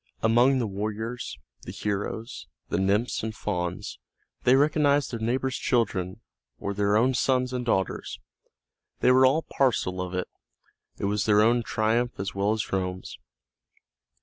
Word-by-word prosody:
Among 120 +4 +4
the 125 - 0
warriors, 110 +4 -4 0.2
the - - -8
heroes, 105 +3 -4 0.2
the 85 - 0
nymphs 100 +5 +1
and 110 0 -4
fauns, 90 -5 -4 0.5
they 125 - +6
recognized 145 -1 +3
their 115 - -4
neighbors' 130 +3 -1
children 105 -4 0 0.4
or 100 - -3
their 100 +1 +2
own 125 +4 +3
sons 130 0 +1
and 125 -1 -2
daughters; 95 -6 -1 0.8
they 125 - +5
were 130 +1 +6
all 155 +5 +2
parcel 95 -8 0
of 90 0 -4
it; 90 - -2 0.7
it - - -3
was 100 +1 0
their 105 -1 +5
own 120 +2 +4
triumph 115 +2 0
as 100 +1 -3
well 100 +2 +1
as 110 -2 -2
Rome's. 95 -1 -3
110 Hz, 150 wpm, -26 LUFS, 100-125 Hz, 0.8 s, they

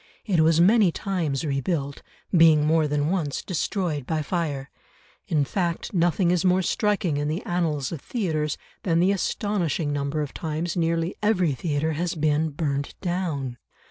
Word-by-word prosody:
It 190 -6 +1
was 160 +1 +4
many 200 +1 +5
times 165 -7 -2
rebuilt, 140 0 -2 0.3
being 160 -3 +6
more 160 0 +3
than 150 +2 0
once 160 -7 -1
destroyed 170 - -2
by 155 -1 -1
fire; 145 -5 -3 0.6
in 150 -3 +1
fact 170 +3 -2
nothing 175 0 +2
is 180 -2 +1
more 185 0 +3
striking 200 -6 0
in 145 0 -1
the 160 +6 -2
annals 160 -6 -1
of 160 -5 -5
theatres 155 - -2 0.2
than 165 -3 +1
the 185 +3 +4
astonishing 185 -6 -1
number 145 +1 -1
of 145 - -7
times 160 +1 -3
nearly 165 +1 0
every 190 -6 +2
theatre 150 +3 -1
has 170 +3 -2
been 155 0 +1
burnt 140 -2 -3
down. 165 -9 -2
165 Hz, 155 wpm, -25 LUFS, 150-180 Hz, 0.6 s, being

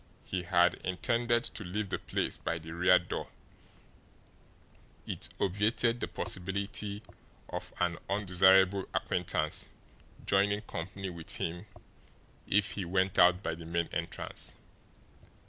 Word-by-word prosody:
He 95 - -2
had 90 0 +3
intended 120 +5 +1
to 110 - -4
leave 100 +3 -3
the - - -1
place - - -2
by 85 - -1
the 80 0 -9
rear 90 +2 +5
door 85 - -4 1.8
it - - -4
obviated 110 +5 +2
the - - -2
possibility 100 +2 -2 0.5
of - - -5
an 85 -1 +1
undesirable 95 -1 +4
acquaintance - - -1 0.6
joining 100 +1 +3
company 95 -1 -5
with 85 -2 -7
him 85 +5 -3 0.8
if 105 +1 +3
he 100 - -3
went 95 +2 +1
out 90 +1 +6
by - - -1
the 80 +1 -8
main 85 0 0
entrance. 85 -1 -4
95 Hz, 120 wpm, -31 LUFS, 90-100 Hz, 1.8 s, out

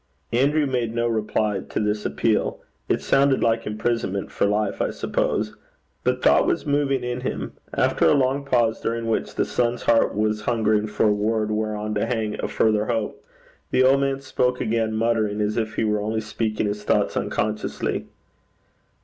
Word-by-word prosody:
Andrew 145 +5 +3
made 120 -4 -1
no 120 0 +1
reply 110 -2 0
to - - -2
this 105 0 0
appeal. 110 -2 0 0.3
It - - +1
sounded 135 -1 +3
like 115 -1 +1
imprisonment 105 -2 -2
for - - +1
life, 105 0 0
I - - +1
suppose. 105 0 -1 0.5
But - - 0
thought - - +5
was - - 0
moving 140 -3 +1
in 125 0 -3
him. 130 - -4 0.2
After - - +2
a - - +5
long 135 +1 +1
pause, 120 -5 +1
during 115 0 -2
which 115 -1 -1
the - - +1
son's 120 0 -1
heart 115 -3 +3
was 105 0 0
hungering 110 -1 +1
for 105 +1 +1
a 105 - +4
word 110 +1 0
whereon 105 0 -2
to 105 - 0
hang 110 -3 -2
a - - 0
further 110 -1 +2
hope, 115 -3 -2 0.5
the 130 - +3
old 135 +1 +5
man 135 0 0
spoke 125 -2 0
again, 110 0 0
muttering 110 -2 +1
as 105 0 0
if 110 -1 -2
he - - 0
were 105 -1 +1
only 110 +1 -1
speaking 110 0 -2
his 105 0 -3
thoughts - - +1
unconsciously. 105 0 -2
110 Hz, 175 wpm, -23 LUFS, 105-120 Hz, 0.5 s, thought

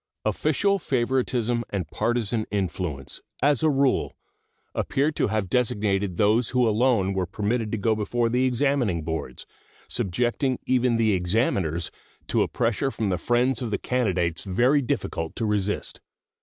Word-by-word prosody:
Official 200 -1 +1
favoritism 120 -4 0
and 95 -5 -3
partisan 115 -2 0
influence, 90 -8 -3 0.2
as 145 -3 +3
a 155 - +4
rule, 140 -2 +1 0.6
appear 140 +3 0
to - - 0
have 110 -2 -1
designated 100 -5 0
those 110 +3 +3
who 125 -2 +2
alone 110 -3 +2
were 95 -2 -1
permitted 105 +3 -1
to 115 - -1
go 110 +2 +2
before 115 +3 0
the 125 +2 +1
examining 125 - +1
boards, 80 -6 -5 0.4
subjecting 120 - 0
even 125 -2 +2
the 110 -2 +3
examiners 90 -3 0 0.4
to - - +2
a - - +2
pressure 120 +3 0
from 110 -6 -2
the 90 -2 0
friends 120 +4 +1
of 120 - -2
the 105 - 0
candidates 95 -10 0
very 125 +9 +3
difficult 80 -9 -3
to 115 - -1
resist. 105 -1 -2
115 Hz, 145 wpm, -25 LUFS, 95-125 Hz, 0.6 s, a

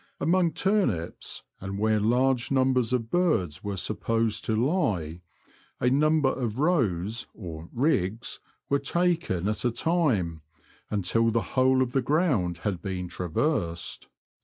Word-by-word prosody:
Among 175 0 +2
turnips, 190 - -1 0.2
and 95 +1 -5
where 110 +1 +2
large 125 +3 +2
numbers 130 -3 +2
of 115 -3 -1
birds 110 - +1
were 100 -1 -3
supposed 115 +2 -1
to 110 - 0
lie, 110 - 0 0.6
a 125 - +2
number 150 0 +3
of 120 -4 -3
rows 115 - 0
or 80 -5 -7
^' - - -17
riggs 115 - 0
" - - -45
were 140 - +2
taken 165 - 0
at 105 0 -1
a 125 - +3
time, 115 - 0 0.5
until 105 +3 +2
the 115 0 +1
whole 130 0 +4
of 125 - -4
the 135 - +1
ground 125 - +1
had 95 -4 -1
been 90 -2 -4
traversed. 85 - -2
115 Hz, 140 wpm, -27 LUFS, 95-140 Hz, 0.6 s, whole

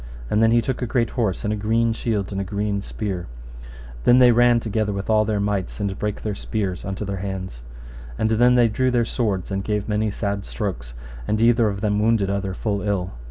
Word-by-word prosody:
And 105 - +3
then 115 - +5
he 115 0 +3
took 130 +1 -2
a 125 - -1
great 120 0 0
horse, 110 -7 -1
and 105 0 0
a - - -1
green 115 +2 +1
shield 105 -4 -2
and 100 0 -2
a - - -1
green 100 +1 -2
spear. 100 -4 -4 0.3
And - - -14
then 120 - +6
they 125 -1 +7
ran 120 0 +5
together 110 -2 -1
with 100 +2 -3
all 110 0 +4
their 105 -1 0
mights, 100 -2 -2
and 100 -1 -3
brake 105 -1 -3
their 105 - -2
spears 100 -3 -3
unto 100 +2 -4
their 100 -1 -3
hands. 95 -9 -5 0.6
And 110 - 0
then 120 +3 +4
they 120 -1 +5
drew 130 +4 +1
their 120 -2 +2
swords, 105 -6 -2
and 95 0 -2
gave 105 0 -2
many 105 0 0
sad 100 -1 -3
strokes, 75 - -5 0.3
and 110 - 0
either 115 0 +4
of 100 -1 -5
them 105 -1 +1
wounded 105 -3 +2
other 100 -1 -2
full 100 -1 -2
ill. 100 -3 -1
105 Hz, 225 wpm, -22 LUFS, 100-115 Hz, 0.6 s, they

